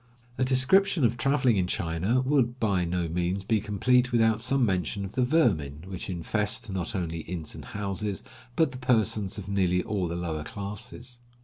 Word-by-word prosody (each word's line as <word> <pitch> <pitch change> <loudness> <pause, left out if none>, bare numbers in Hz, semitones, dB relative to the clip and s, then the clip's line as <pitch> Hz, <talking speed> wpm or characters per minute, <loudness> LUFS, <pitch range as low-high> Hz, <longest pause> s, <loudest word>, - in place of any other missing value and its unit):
A - - +3
description 145 +7 +3
of 120 -1 +3
traveling 130 -4 +2
in 90 -1 +1
China 90 +9 0
would 130 -2 +1
by 100 -6 +1
no 85 0 -1
means 90 +3 -1
be 110 +2 +1
complete 125 +6 +2
without 115 -1 +3
some 135 +1 +2
mention 95 0 -1
of 95 - -7
the 130 - 0
vermin 85 - +1
which 95 0 -7
infest, 105 +5 -1
not 95 +1 -3
only 85 -3 -2
inns 80 -1 -5
and - - -9
houses, 100 0 -3 0.3
but 160 -4 +3
the 130 - -8
persons 110 -6 +1
of 100 -3 -7
nearly 90 -2 +1
all 100 -4 -1
the 85 - -4
lower 80 -3 -3
classes. 105 +6 -6
100 Hz, 180 wpm, -27 LUFS, 90-125 Hz, 0.3 s, A